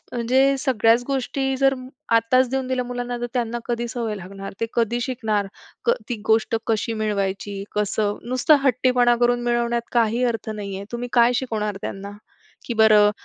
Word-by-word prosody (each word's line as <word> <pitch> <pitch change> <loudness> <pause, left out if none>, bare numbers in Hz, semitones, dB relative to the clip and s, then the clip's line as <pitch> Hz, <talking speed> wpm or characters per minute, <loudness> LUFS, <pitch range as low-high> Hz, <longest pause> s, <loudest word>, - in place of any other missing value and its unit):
म्हणजे 260 +3 +2
सगळ्याच 245 -3 +3
गोष्टी 270 0 -1
जर 270 0 +3 0.4
आत्ताच 240 +3 +4
देऊन 265 0 -1
दिल्या 255 -1 -1
मुलांना, 245 0 -4
तर 240 - -1
त्यांना 240 -1 -1
कधी 240 0 -2
सवय 230 -2 -3
लागणार, 195 +1 -8
ते 230 - +1
कधी 235 +1 +1
शिकणार 220 -5 -1 0.4
क, 475 - +5 0.2
ती 240 - -2
गोष्ट 225 +1 +2
कशी 225 +1 0
मिळवायची. 200 -2 -2
कसं 210 0 0
नुसता 255 +4 +4
हट्टीपणा 250 -1 +3
करून 240 0 +2
मिळवण्यात 235 0 0
काही 235 +1 +2
अर्थ 225 -3 -2
नाहीये. 200 -2 -5
तुम्ही 240 +1 -4
काय 240 0 +5
शिकवणार 215 -5 -2
त्यांना 195 +1 -5 0.6
की 240 - -3
बरं 215 -2 +6
235 Hz, 160 wpm, -22 LUFS, 215-250 Hz, 0.6 s, बरं